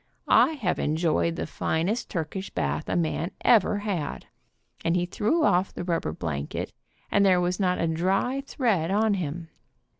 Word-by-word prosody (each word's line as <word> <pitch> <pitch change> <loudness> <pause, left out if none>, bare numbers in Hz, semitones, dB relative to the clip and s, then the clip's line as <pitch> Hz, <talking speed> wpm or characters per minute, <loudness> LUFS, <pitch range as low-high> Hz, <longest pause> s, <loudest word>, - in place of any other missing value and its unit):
I 320 - +6
have 220 - -1
enjoyed 165 +1 +1
the - - -3
finest 175 +8 -1
Turkish 185 +3 -4
bath 70 +1 -2
a - - 0
man 165 0 0
ever 210 -3 +4
had," 195 -8 -3 0.6
and 165 +1 +1
he 175 0 +1
threw 225 - 0
off 185 -8 +3
the - - -4
rubber 175 -2 -1
blanket 75 -4 -4 0.4
and 200 - +4
there 185 -2 +5
was 180 +1 -1
not 180 -2 +1
a - - +1
dry 190 +11 0
thread 205 - 0
on 210 +2 +2
him. 170 -2 -4
180 Hz, 160 wpm, -26 LUFS, 165-205 Hz, 0.6 s, I